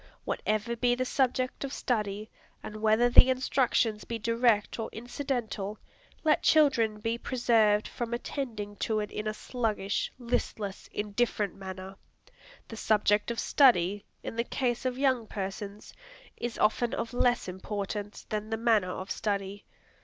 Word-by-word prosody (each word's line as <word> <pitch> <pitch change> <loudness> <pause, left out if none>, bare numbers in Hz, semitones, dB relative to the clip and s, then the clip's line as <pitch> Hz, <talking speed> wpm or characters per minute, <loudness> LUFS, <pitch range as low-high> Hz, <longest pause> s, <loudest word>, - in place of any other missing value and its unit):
Whatever 215 +2 -1
be 245 +1 +2
the 255 +1 -1
subject 255 0 0
of 275 - -4
study, 210 -5 -2 0.4
and 215 - -7
whether 220 +2 +4
the 245 +1 +8
instructions 255 -4 +1
be 230 - -4
direct 230 -1 +2
or 225 - -3
incidental, 230 -4 -3 0.5
let 310 -1 +3
children 240 -9 +4
be 225 +2 -2
preserved 225 -5 +3
from 240 -1 -5
attending 230 -4 -4
to 220 -1 0
it 210 - -4
in 210 - -4
a 215 - -1
sluggish, 215 -5 -2
listless, 220 -5 -3
indifferent 210 0 -1
manner. 190 0 -8 0.7
The 225 - -8
subject 210 -1 +2
of 235 - -2
study, 205 -7 +4 0.2
in - - -5
the 235 - +2
case 240 0 -1
of 255 -1 -1
young 260 -5 +2
persons, 200 +1 -6 0.4
is 240 -1 -4
often 235 +2 +2
of 235 - -4
less 245 -2 +2
importance 205 +2 -5
than 215 0 -4
the 225 - -1
manner 220 -5 +3
of 185 +1 -5
study. 200 -1 -2
220 Hz, 145 wpm, -29 LUFS, 205-245 Hz, 0.7 s, the